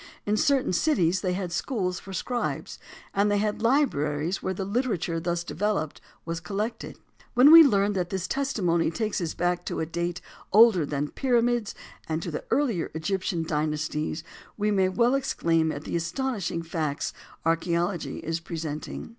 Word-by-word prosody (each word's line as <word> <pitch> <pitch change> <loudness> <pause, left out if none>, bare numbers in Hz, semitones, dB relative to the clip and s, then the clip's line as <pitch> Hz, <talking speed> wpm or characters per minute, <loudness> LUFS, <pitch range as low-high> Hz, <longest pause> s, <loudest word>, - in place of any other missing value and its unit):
In 210 - +1
certain 265 -2 +2
cities 185 - +2
they 185 -2 0
had 180 -2 -3
schools 185 -2 -2
for 195 - -11
scribes, 240 +6 -3 0.3
and 200 +1 +2
they 205 - +2
had 210 +1 -1
libraries 175 - +1
where 190 - -2
the 195 - -3
literature 200 -7 -1
thus 170 0 -2
developed 175 -4 -2 0.2
was 165 0 -3
collected. 210 +6 -4 0.4
When 265 +5 +8
we 330 0 +12
learn 205 -8 +4
that 180 -3 -1
this 190 -1 -3
testimony 195 - +1
takes 215 +3 -2
us 165 -2 -3
back 175 0 0
to - - -3
a 160 - 0
date 170 +2 -3 0.3
older 210 -8 +6
than 145 0 -1
the - - -9
pyramids 240 -4 +1 0.3
and 160 0 0
to 170 - -4
the 150 - -4
earlier 245 - +1
Egyptian 175 +1 -1
dynasties, 155 0 -2 0.3
we 210 0 +1
may 190 -2 +3
well 235 +6 +2
exclaim 165 -12 +1
at 145 0 -6
the - - -4
astonishing 170 0 -2
facts 155 -3 -2 0.3
archæology 170 +2 0
is 165 +1 -2
presenting. 160 -3 -5
180 Hz, 165 wpm, -26 LUFS, 165-215 Hz, 0.4 s, we